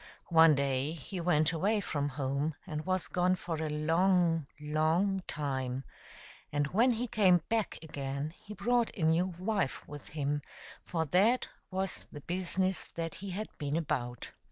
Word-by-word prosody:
One 160 Hz, -2 st, +8 dB
day 140 Hz, +1 st, 0 dB
he 170 Hz, +4 st, -6 dB
went 155 Hz, -2 st, +3 dB
away 205 Hz, +7 st, +2 dB
from 145 Hz, -7 st, -1 dB
home 140 Hz, +2 st, -1 dB
and 155 Hz, -2 st, -5 dB
was 185 Hz, -2 st, +1 dB
gone 180 Hz, +1 st, +2 dB
for 170 Hz, -3 st, -4 dB
a 155 Hz, 0 st, -2 dB
long, 165 Hz, +1 st, +2 dB
long 160 Hz, +6 st, +1 dB
time, 135 Hz, -3 st, -2 dB, 0.7 s
and 145 Hz, 0 st, +1 dB
when 230 Hz, -, +3 dB
he 235 Hz, +2 st, -1 dB
came 195 Hz, -8 st, +4 dB
back 225 Hz, -2 st, 0 dB
again 140 Hz, 0 st, -4 dB
he 210 Hz, -, -9 dB
brought 240 Hz, 0 st, +2 dB
a 175 Hz, -, -2 dB
new 165 Hz, +3 st, +4 dB
wife 195 Hz, -5 st, -1 dB
with 145 Hz, -1 st, -9 dB
him, 145 Hz, 0 st, 0 dB, 0.4 s
for 165 Hz, -2 st, -1 dB
that 200 Hz, -, +3 dB, 0.2 s
was 190 Hz, 0 st, -3 dB
the 145 Hz, -, -8 dB
business 185 Hz, +3 st, -1 dB
that 165 Hz, -1 st, -3 dB
he 200 Hz, -, -5 dB
had 205 Hz, +4 st, -4 dB
been 145 Hz, 0 st, -1 dB
about. 120 Hz, -7 st, -2 dB
165 Hz, 155 wpm, -32 LUFS, 145-190 Hz, 0.7 s, One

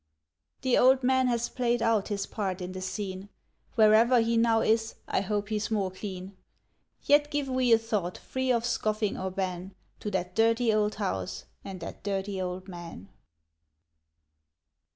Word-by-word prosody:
The 260 Hz, -2 st, +3 dB
old 260 Hz, +1 st, +5 dB
man 260 Hz, 0 st, +3 dB
has 235 Hz, -1 st, 0 dB
played 240 Hz, -1 st, 0 dB
out 225 Hz, -3 st, +1 dB
his 200 Hz, -2 st, -2 dB
part 195 Hz, -4 st, -3 dB
in 180 Hz, 0 st, -5 dB
the 185 Hz, 0 st, -6 dB
scene. 190 Hz, 0 st, -5 dB, 0.5 s
Wherever 225 Hz, +2 st, +6 dB
he 230 Hz, 0 st, +1 dB
now 230 Hz, -1 st, +3 dB
is, 225 Hz, 0 st, +1 dB
I -, -, +1 dB
hope 205 Hz, +1 st, -2 dB
he's 215 Hz, 0 st, -1 dB
more 200 Hz, -4 st, 0 dB
clean. 190 Hz, 0 st, -7 dB, 0.7 s
Yet 290 Hz, 0 st, +4 dB
give 290 Hz, -2 st, -1 dB
we 255 Hz, -2 st, +1 dB
a 225 Hz, -, +8 dB
thought 210 Hz, -6 st, -2 dB
free 260 Hz, 0 st, -2 dB
of 235 Hz, -1 st, +1 dB
scoffing 215 Hz, -3 st, 0 dB
or 190 Hz, -, -3 dB
ban 185 Hz, 0 st, -4 dB, 0.2 s
To 210 Hz, -, -4 dB
that 185 Hz, -2 st, -2 dB
Dirty 225 Hz, +1 st, +3 dB
Old 210 Hz, 0 st, +1 dB
House 95 Hz, -, -3 dB, 0.2 s
and 190 Hz, -2 st, -7 dB
that 165 Hz, -, -7 dB
Dirty 195 Hz, -1 st, -2 dB
Old 185 Hz, +1 st, -4 dB
Man. 170 Hz, -, -9 dB
210 Hz, 160 wpm, -28 LUFS, 190-235 Hz, 0.7 s, a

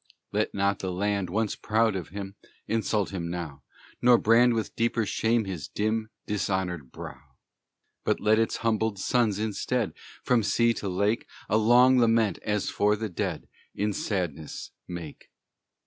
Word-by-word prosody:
Let -, -, -1 dB
not 100 Hz, 0 st, +1 dB
the 95 Hz, -, -3 dB
land 100 Hz, 0 st, -1 dB
once 105 Hz, +3 st, 0 dB
proud 110 Hz, -1 st, +1 dB
of 90 Hz, -4 st, -4 dB
him 100 Hz, 0 st, -6 dB, 0.3 s
Insult 110 Hz, -2 st, 0 dB
him 85 Hz, -3 st, -4 dB
now, 85 Hz, -5 st, -5 dB, 0.4 s
Nor 120 Hz, 0 st, +7 dB
brand 115 Hz, +2 st, +5 dB
with 110 Hz, -, -3 dB
deeper 115 Hz, -1 st, +1 dB
shame 115 Hz, +1 st, +1 dB
his 95 Hz, -5 st, -5 dB
dim, 110 Hz, +1 st, -1 dB, 0.2 s
Dishonored 95 Hz, -8 st, -2 dB
brow. -, -, -9 dB, 0.8 s
But -, -, +1 dB
let 110 Hz, +1 st, +3 dB
its 115 Hz, -, +1 dB
humbled 110 Hz, -2 st, +1 dB
sons, 110 Hz, 0 st, +1 dB
instead, 110 Hz, +2 st, -1 dB, 0.3 s
From 125 Hz, -2 st, +3 dB
sea 115 Hz, +2 st, +3 dB
to 100 Hz, -3 st, -4 dB
lake, 100 Hz, +5 st, 0 dB, 0.2 s
A 110 Hz, -, +3 dB
long 125 Hz, +4 st, +6 dB
lament, 115 Hz, -5 st, +3 dB
as 105 Hz, -1 st, -1 dB
for 105 Hz, +1 st, +2 dB
the 110 Hz, +1 st, -4 dB
dead, 90 Hz, -3 st, -3 dB, 0.3 s
In 105 Hz, 0 st, 0 dB
sadness 85 Hz, -8 st, -3 dB, 0.2 s
make. 85 Hz, -4 st, -8 dB
105 Hz, 150 wpm, -27 LUFS, 95-115 Hz, 0.8 s, Nor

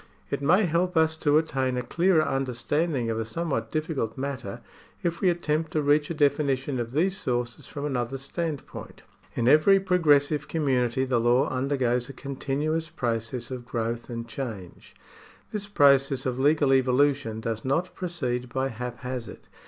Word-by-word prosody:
It -, -, -1 dB
may 180 Hz, +9 st, +4 dB
help 175 Hz, +1 st, 0 dB
us 160 Hz, 0 st, +3 dB
to 150 Hz, -1 st, +3 dB
attain 135 Hz, -5 st, 0 dB
a 125 Hz, -, -1 dB
clearer 170 Hz, +2 st, +2 dB
understanding 135 Hz, 0 st, -1 dB
of 110 Hz, -, -2 dB
a -, -, 0 dB
somewhat 135 Hz, 0 st, -3 dB
difficult 155 Hz, -8 st, -2 dB
matter 130 Hz, -7 st, -5 dB, 0.4 s
if 170 Hz, -1 st, -1 dB
we 185 Hz, -, +4 dB
attempt 160 Hz, -2 st, -1 dB
to 155 Hz, -, +1 dB
reach 145 Hz, +1 st, +3 dB
a 170 Hz, -, -3 dB
definition 140 Hz, -3 st, +1 dB
of 120 Hz, 0 st, -4 dB
these 180 Hz, +6 st, +2 dB
sources 120 Hz, -6 st, -3 dB
from 145 Hz, -1 st, -5 dB
another 130 Hz, -2 st, -2 dB
standpoint. 150 Hz, +2 st, -5 dB, 0.3 s
In 120 Hz, -, 0 dB
every 155 Hz, +8 st, +6 dB
pro 185 Hz, -1 st, +1 dB
gressive 145 Hz, -2 st, +3 dB
community 130 Hz, -4 st, +1 dB
the 125 Hz, -2 st, +1 dB
law 120 Hz, +5 st, +3 dB
undergoes 130 Hz, -2 st, 0 dB
a -, -, -7 dB
continuous 145 Hz, +4 st, -2 dB
process 115 Hz, +1 st, -3 dB
of 125 Hz, -1 st, -5 dB
growth 115 Hz, 0 st, -3 dB
and 115 Hz, -1 st, -5 dB
change. 110 Hz, -7 st, -7 dB, 0.6 s
This 205 Hz, -1 st, -4 dB
process 140 Hz, -6 st, +4 dB
of 130 Hz, -1 st, -2 dB
legal 145 Hz, 0 st, +3 dB
evolution 130 Hz, -2 st, +2 dB
does 110 Hz, 0 st, -3 dB
not 165 Hz, +7 st, 0 dB
proceed 125 Hz, -9 st, -3 dB
by 130 Hz, +2 st, -1 dB
haphazard. 125 Hz, 0 st, -6 dB
135 Hz, 160 wpm, -26 LUFS, 125-155 Hz, 0.6 s, every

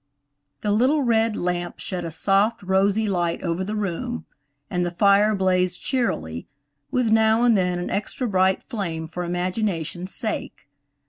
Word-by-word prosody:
THE 210 Hz, -, 0 dB
little 260 Hz, +8 st, +3 dB
red 225 Hz, -2 st, +2 dB
lamp 175 Hz, 0 st, -2 dB
shed 180 Hz, -2 st, -4 dB
a 170 Hz, -, -4 dB
soft, 195 Hz, +7 st, +2 dB
rosy 195 Hz, +3 st, +2 dB
light 175 Hz, -4 st, -1 dB
over 170 Hz, +1 st, -1 dB
the 210 Hz, +3 st, -3 dB
room, 170 Hz, -, -3 dB, 0.4 s
and 180 Hz, +3 st, -1 dB
the 175 Hz, -, 0 dB
fire 200 Hz, +4 st, +4 dB
blazed 185 Hz, -1 st, +1 dB
cheerily, 85 Hz, -, -2 dB, 0.4 s
with 245 Hz, -3 st, +1 dB
now 220 Hz, +1 st, +4 dB
and 240 Hz, -2 st, +5 dB
then 180 Hz, -2 st, +1 dB
an 175 Hz, -, -4 dB
extra 240 Hz, +5 st, -2 dB
bright 190 Hz, -2 st, +2 dB
flame 170 Hz, -9 st, -4 dB
for 170 Hz, +2 st, -5 dB
imagination's 180 Hz, 0 st, -2 dB
sake. 220 Hz, -2 st, -3 dB
190 Hz, 150 wpm, -23 LUFS, 175-215 Hz, 0.4 s, and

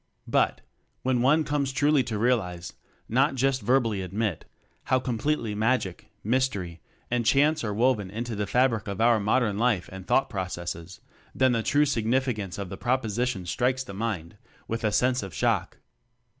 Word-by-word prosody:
But, -, -, +1 dB, 0.4 s
when 125 Hz, -2 st, +1 dB
one 150 Hz, +5 st, +4 dB
comes 145 Hz, -2 st, -1 dB
truly 145 Hz, +1 st, +3 dB
to 110 Hz, -, -3 dB
realize 95 Hz, -7 st, 0 dB, 0.3 s
not 135 Hz, +5 st, +2 dB
just 135 Hz, 0 st, +1 dB
verbally 115 Hz, -3 st, +1 dB
admit 100 Hz, 0 st, -2 dB, 0.4 s
how 130 Hz, -, +2 dB
completely 125 Hz, -1 st, -1 dB
magic, 110 Hz, -3 st, -1 dB
mys 130 Hz, +4 st, +2 dB
tery, 90 Hz, -7 st, -6 dB, 0.3 s
and 120 Hz, -1 st, +1 dB
chance 145 Hz, +5 st, +3 dB
are 105 Hz, -, -1 dB
woven 110 Hz, -2 st, +1 dB
into 115 Hz, +3 st, -4 dB
the 105 Hz, 0 st, -2 dB
fabric 120 Hz, -2 st, +2 dB
of 100 Hz, 0 st, -4 dB
our 115 Hz, 0 st, +4 dB
modern 105 Hz, 0 st, +1 dB
life 115 Hz, -6 st, +1 dB
and 95 Hz, -1 st, -9 dB
thought 135 Hz, 0 st, +3 dB
processes, 90 Hz, -3 st, -5 dB, 0.3 s
then 130 Hz, -1 st, +3 dB
the 115 Hz, -2 st, +1 dB
true 145 Hz, +6 st, +3 dB
sig 115 Hz, -6 st, -1 dB
nificance 115 Hz, -7 st, 0 dB
of 100 Hz, -2 st, -5 dB
the 95 Hz, -, -7 dB
propositions 120 Hz, -5 st, -1 dB
strikes 130 Hz, +1 st, 0 dB
the 130 Hz, -, -9 dB
mind 95 Hz, -6 st, -4 dB, 0.3 s
with 115 Hz, +1 st, -3 dB
a 110 Hz, -, +2 dB
sense 125 Hz, +4 st, +2 dB
of 95 Hz, -4 st, -8 dB
shock. -, -, 0 dB
115 Hz, 170 wpm, -26 LUFS, 100-130 Hz, 0.4 s, one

